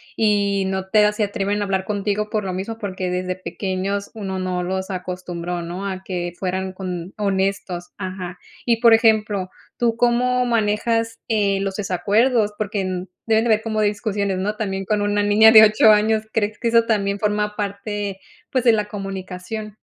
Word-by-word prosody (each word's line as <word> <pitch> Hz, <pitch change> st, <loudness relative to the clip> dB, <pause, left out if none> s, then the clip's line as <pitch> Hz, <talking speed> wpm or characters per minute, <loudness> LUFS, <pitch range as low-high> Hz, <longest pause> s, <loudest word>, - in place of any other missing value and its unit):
y 200 Hz, -2 st, +2 dB
no 190 Hz, 0 st, -3 dB
te 215 Hz, +1 st, +5 dB
a 210 Hz, -, +3 dB
se 210 Hz, +1 st, -1 dB
atreven 205 Hz, 0 st, -1 dB
a -, -, 0 dB
hablar 190 Hz, -1 st, -1 dB
contigo 210 Hz, +1 st, -1 dB
por 215 Hz, -1 st, -1 dB
lo 190 Hz, -1 st, -3 dB
mismo, 195 Hz, +5 st, -4 dB
porque 190 Hz, -4 st, -4 dB
desde 180 Hz, 0 st, -2 dB
pequeños 195 Hz, +1 st, -3 dB
uno 195 Hz, -4 st, -4 dB
no 185 Hz, -1 st, -2 dB
los 190 Hz, +2 st, -3 dB
acostumbró, 180 Hz, -1 st, -4 dB
¿no?, 180 Hz, +4 st, -5 dB
a 190 Hz, -1 st, -5 dB
que 175 Hz, -2 st, -4 dB
fueran 190 Hz, 0 st, -2 dB
con 185 Hz, -1 st, -6 dB
honestos, 195 Hz, -3 st, -2 dB
ajá. 185 Hz, -2 st, -6 dB, 0.3 s
Y, 235 Hz, -2 st, +2 dB
por 230 Hz, -1 st, +6 dB
ejemplo, 215 Hz, -4 st, +3 dB, 0.3 s
¿tú 235 Hz, -2 st, +1 dB
cómo 250 Hz, +1 st, +2 dB
manejas, 225 Hz, 0 st, 0 dB
eh, 200 Hz, -3 st, +2 dB
los 195 Hz, -1 st, -2 dB
desacuerdos? 210 Hz, +3 st, +1 dB
Porque, 205 Hz, -2 st, -2 dB
mm, 185 Hz, 0 st, -4 dB, 0.2 s
deben 220 Hz, 0 st, +3 dB
de -, -, +1 dB
haber 220 Hz, 0 st, +3 dB
como 215 Hz, -1 st, -1 dB
discusiones, 205 Hz, -2 st, -1 dB
¿no? 205 Hz, +3 st, -2 dB
También 195 Hz, -3 st, -3 dB
con 210 Hz, +1 st, 0 dB
una 205 Hz, 0 st, +1 dB
niña 210 Hz, +2 st, +6 dB
de 220 Hz, -1 st, +10 dB
8 215 Hz, 0 st, +6 dB
años, 215 Hz, +1 st, +3 dB
¿crees 215 Hz, -1 st, -1 dB
que 235 Hz, -, -1 dB
eso 230 Hz, 0 st, +4 dB
también 200 Hz, -3 st, 0 dB
forma 210 Hz, 0 st, 0 dB
parte, 200 Hz, -1 st, -4 dB, 0.3 s
pues, 255 Hz, -2 st, +1 dB
de 240 Hz, -, +6 dB
la 215 Hz, -2 st, +1 dB
comunicación? 195 Hz, +1 st, -6 dB
205 Hz, 180 wpm, -21 LUFS, 190-215 Hz, 0.3 s, de